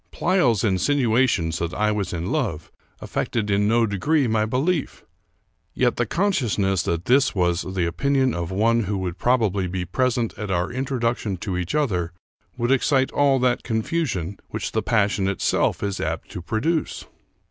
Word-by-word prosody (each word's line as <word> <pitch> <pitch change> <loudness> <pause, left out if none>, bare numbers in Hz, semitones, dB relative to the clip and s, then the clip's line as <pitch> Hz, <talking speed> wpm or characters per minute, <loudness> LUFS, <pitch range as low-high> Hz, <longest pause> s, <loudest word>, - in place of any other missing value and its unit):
Pleyel's 135 - +2
insinuations 110 - +1
that 85 +1 -3
I 105 0 +1
was 105 -2 -2
in 85 +2 -3
love 105 - -2 0.3
affected 105 -3 -2
in 100 +1 +2
no 115 +1 +3
degree 130 - +1
my 110 -1 +1
belief; 140 +7 -1 0.7
yet 125 -1 +1
the 120 - 0
consciousness 110 - +1
that 85 +1 -2
this 130 0 +3
was 90 -1 +1
the 95 -2 -2
opinion 130 +9 +1
of 85 -1 -3
one 115 +4 +2
who 100 +1 -2
would 90 -2 -4
probably 105 -6 +1
be 90 0 -3
present 120 +5 0
at 105 -2 -4
our 90 -1 0
introduction 120 -5 -2
to 95 +1 -4
each 90 - -2
other 90 - 0 0.4
would 120 +2 0
excite 135 0 +2
all 140 -2 +3
that 125 -1 +2
confusion 110 - -2
which - - -4
the - - 0
passion 105 -3 +1
itself 100 +1 0
is 100 -1 -2
apt - - -3
to 90 - -6
produce. 150 - -2
110 Hz, 160 wpm, -23 LUFS, 95-130 Hz, 0.7 s, no